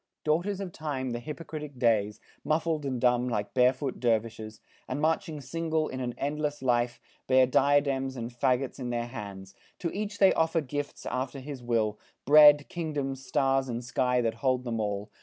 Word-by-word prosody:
"Daughters 175 Hz, +6 st, 0 dB
of 195 Hz, -3 st, -5 dB
Time, 140 Hz, -6 st, -4 dB
the 120 Hz, -, -3 dB
hypocritic 150 Hz, 0 st, -7 dB
days, 110 Hz, -4 st, +2 dB, 0.2 s
Muffled 155 Hz, -2 st, 0 dB
and 130 Hz, -2 st, -2 dB
dumb 125 Hz, 0 st, +2 dB
like 105 Hz, -3 st, -2 dB
barefoot 130 Hz, +1 st, +2 dB
dervishes, 110 Hz, -2 st, -1 dB, 0.3 s
And 130 Hz, +2 st, -3 dB
marching 160 Hz, 0 st, 0 dB
single 160 Hz, +3 st, -1 dB
in 130 Hz, -, -5 dB
an 125 Hz, -2 st, -3 dB
endless 150 Hz, 0 st, -2 dB
file, 120 Hz, -2 st, +2 dB, 0.4 s
Bear 130 Hz, 0 st, +6 dB
diadems 135 Hz, 0 st, +2 dB
and 120 Hz, -1 st, -5 dB
fagots 125 Hz, +3 st, 0 dB
in 125 Hz, -2 st, -4 dB
their 120 Hz, -1 st, -1 dB
hands. 100 Hz, -5 st, -8 dB, 0.2 s
To 170 Hz, -, -3 dB
each 205 Hz, 0 st, -4 dB
they 195 Hz, -2 st, +6 dB
offer 165 Hz, +1 st, +2 dB
gifts 145 Hz, 0 st, -5 dB
after 130 Hz, +2 st, -3 dB
his 135 Hz, -1 st, -7 dB
will 115 Hz, -3 st, 0 dB, 0.3 s
Bread, 145 Hz, 0 st, +8 dB
kingdoms, 145 Hz, -6 st, -3 dB
stars, 135 Hz, 0 st, +1 dB
and 120 Hz, 0 st, -3 dB
sky 125 Hz, +1 st, +1 dB
that 115 Hz, -1 st, 0 dB
hold 130 Hz, -2 st, +1 dB
them 115 Hz, -2 st, -3 dB
all. 105 Hz, 0 st, -3 dB
130 Hz, 170 wpm, -28 LUFS, 120-150 Hz, 0.4 s, Bread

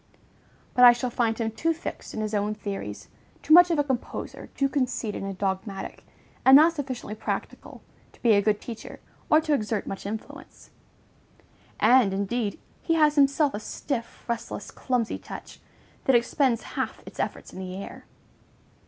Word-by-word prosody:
But 250 Hz, -, +4 dB
I 245 Hz, -1 st, +11 dB
shall 245 Hz, +1 st, -3 dB
find 230 Hz, -2 st, 0 dB
him 225 Hz, -1 st, -1 dB
too 330 Hz, +9 st, 0 dB
fixed 335 Hz, -, -7 dB
in 220 Hz, -, -2 dB
his 215 Hz, 0 st, -3 dB
own 210 Hz, +1 st, 0 dB
theories, 200 Hz, -2 st, -6 dB, 0.4 s
too 310 Hz, -, +4 dB
much 355 Hz, +1 st, +9 dB
of 335 Hz, -, +1 dB
a 290 Hz, -, +3 dB
composer, 265 Hz, -4 st, -4 dB
too 275 Hz, -, +3 dB
conceited 250 Hz, -6 st, -2 dB
and 195 Hz, -1 st, -5 dB
dogmatic, 195 Hz, 0 st, -4 dB, 0.4 s
and 265 Hz, -, +8 dB
not 320 Hz, +4 st, +7 dB
sufficiently 260 Hz, -8 st, -5 dB
practical, 215 Hz, -, -5 dB, 0.3 s
to -, -, -24 dB
be 230 Hz, -2 st, +6 dB
a 200 Hz, -, +5 dB
good 210 Hz, 0 st, +1 dB
teacher, 230 Hz, -2 st, -9 dB, 0.3 s
or 310 Hz, -, +6 dB
to 310 Hz, -1 st, 0 dB
exert 215 Hz, -5 st, -1 dB
much 195 Hz, 0 st, -6 dB
influence; 220 Hz, +2 st, -8 dB, 1.1 s
and, 225 Hz, -3 st, +5 dB
indeed, 205 Hz, +2 st, -2 dB, 0.2 s
he 330 Hz, -, +1 dB
has 305 Hz, -2 st, +4 dB
himself 280 Hz, 0 st, +3 dB
a 205 Hz, -, -3 dB
stiff, 235 Hz, +2 st, -5 dB
restless, 235 Hz, -3 st, -4 dB
clumsy 245 Hz, -4 st, -1 dB
touch, -, -, -10 dB, 0.5 s
that 265 Hz, -, +4 dB
expends 240 Hz, 0 st, +2 dB
half -, -, -3 dB
its -, -, -12 dB
efforts -, -, -4 dB
in -, -, -8 dB
the 185 Hz, -1 st, -6 dB
air. 195 Hz, -, -8 dB
235 Hz, 165 wpm, -26 LUFS, 210-275 Hz, 1.1 s, I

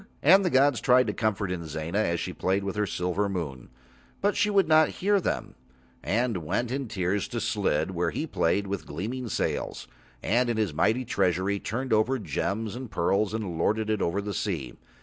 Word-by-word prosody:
And 190 Hz, +7 st, +7 dB
the 180 Hz, -, +2 dB
gods 140 Hz, -2 st, +3 dB
tried 125 Hz, 0 st, +5 dB
to -, -, -2 dB
comfort 105 Hz, -4 st, -1 dB
Inzana 85 Hz, +1 st, -3 dB
as 85 Hz, -5 st, +1 dB
she -, -, -4 dB
played 95 Hz, +1 st, 0 dB
with 100 Hz, 0 st, -3 dB
her 105 Hz, -1 st, 0 dB
silver 90 Hz, +3 st, -1 dB
moon, 75 Hz, -10 st, -5 dB, 0.5 s
but 205 Hz, +1 st, +1 dB
she 205 Hz, -, +2 dB
would 200 Hz, -2 st, +3 dB
not 155 Hz, 0 st, +5 dB
hear 200 Hz, +1 st, +2 dB
Them, -, -, -2 dB, 0.5 s
and 115 Hz, 0 st, 0 dB
went 100 Hz, +9 st, -2 dB
in 135 Hz, -1 st, -2 dB
tears 95 Hz, -1 st, -1 dB
to -, -, -4 dB
Slid, 75 Hz, +5 st, 0 dB
where 90 Hz, -1 st, 0 dB
he 155 Hz, -, -3 dB
played 100 Hz, -, +1 dB
with 100 Hz, -1 st, -4 dB
gleaming 115 Hz, -, -4 dB
sails, 65 Hz, -, -2 dB, 0.4 s
and 120 Hz, +4 st, +2 dB
in 115 Hz, -, 0 dB
his 105 Hz, -7 st, 0 dB
mighty 115 Hz, +11 st, +1 dB
treasury 95 Hz, -2 st, +1 dB
turned 125 Hz, +5 st, -2 dB
over 110 Hz, +5 st, +3 dB
gems 105 Hz, -, -2 dB
and 125 Hz, -1 st, -6 dB
pearls 100 Hz, +4 st, +1 dB
and 100 Hz, -7 st, -4 dB
lorded 110 Hz, +4 st, +1 dB
it 110 Hz, -, 0 dB
over 95 Hz, +4 st, 0 dB
the 100 Hz, 0 st, -4 dB
sea. 80 Hz, -, -3 dB
105 Hz, 190 wpm, -27 LUFS, 90-125 Hz, 0.5 s, And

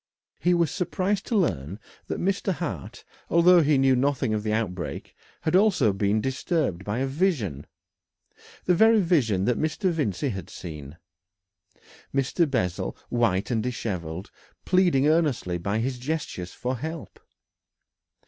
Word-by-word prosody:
He 175 Hz, 0 st, +3 dB
was 170 Hz, -4 st, +2 dB
surprised 195 Hz, +1 st, -1 dB
to 235 Hz, -, -1 dB
learn 95 Hz, -, -1 dB, 0.3 s
that -, -, -3 dB
Mr. 195 Hz, +1 st, 0 dB
Hart, 135 Hz, -, -6 dB, 0.2 s
although 170 Hz, +1 st, +6 dB
he 150 Hz, -1 st, +3 dB
knew 135 Hz, -1 st, +4 dB
nothing 130 Hz, -3 st, +1 dB
of 105 Hz, -, 0 dB
the 105 Hz, 0 st, -2 dB
outbreak, 95 Hz, -6 st, -3 dB, 0.3 s
had 160 Hz, -, 0 dB
also 185 Hz, -, +4 dB
been 100 Hz, +2 st, +1 dB
disturbed 130 Hz, -, -1 dB
by 105 Hz, +3 st, -3 dB
a 130 Hz, -, 0 dB
vision, 135 Hz, -, -1 dB, 1.0 s
the 180 Hz, -, +4 dB
very 220 Hz, +5 st, +5 dB
vision 130 Hz, -, +2 dB
that 125 Hz, -1 st, +1 dB
Mr. 165 Hz, +4 st, 0 dB
Vincey 140 Hz, -, -1 dB
had 95 Hz, -6 st, -6 dB
seen 75 Hz, -3 st, -9 dB, 1.1 s
Mr. 140 Hz, +4 st, +1 dB
Bessel, 90 Hz, -10 st, -1 dB
white 115 Hz, -3 st, +1 dB
and 115 Hz, -2 st, +1 dB
dishevelled, 95 Hz, -7 st, -4 dB, 0.3 s
pleading 175 Hz, -7 st, +3 dB
earnestly 145 Hz, -, +1 dB
by 100 Hz, +5 st, -1 dB
his 125 Hz, +2 st, -2 dB
gestures 125 Hz, -, -4 dB
for 125 Hz, +1 st, -3 dB
help. 160 Hz, +5 st, -7 dB
130 Hz, 140 wpm, -26 LUFS, 100-170 Hz, 1.1 s, although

